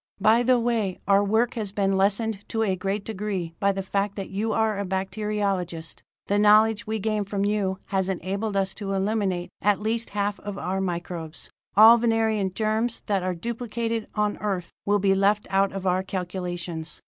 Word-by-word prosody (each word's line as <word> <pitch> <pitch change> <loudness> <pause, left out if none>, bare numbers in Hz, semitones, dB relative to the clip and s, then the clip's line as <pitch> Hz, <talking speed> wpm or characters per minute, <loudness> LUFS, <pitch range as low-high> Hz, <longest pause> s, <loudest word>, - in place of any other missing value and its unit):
"By 220 +4 +5
the 250 0 +3
way, 230 -5 0
our 200 0 +5
work 220 +4 +2
has 215 -5 -3
been 195 -1 +1
lessened 200 +2 +1
to 225 0 0
a 195 -3 +1
great 195 +2 -3
degree 195 -5 -3
by 200 0 +3
the 195 0 -3
fact 200 +1 -1
that 195 -2 -6
you 210 +3 -1
are 220 -2 +1
a - - -1
bacteriologist. 190 -3 -2 0.2
The 205 +1 +1
knowledge 215 +1 +5
we 220 0 -1
gain 215 0 -1
from 200 0 -2
you 200 -2 0
has 190 -1 -1
enabled 195 +3 -2
us 190 -1 0
to 195 -1 -4
eliminate 195 -3 -1
at 205 -1 +3
least 225 +2 -1
half 205 0 0
of 205 -1 -6
our 190 +1 -2
microbes. 170 -3 -5 0.3
All 225 +2 +9
Venerian 220 -4 +1
germs 220 +4 -1
that 200 -3 0
are 185 0 -2
duplicated 230 +2 -3
on 210 -1 0
Earth 190 -5 -3 0.2
will 205 0 +4
be 195 -1 +3
left 200 +2 +2
out 195 0 +3
of 195 -1 -6
our 185 0 +2
calculations. 175 -3 -5
200 Hz, 185 wpm, -25 LUFS, 190-215 Hz, 0.3 s, All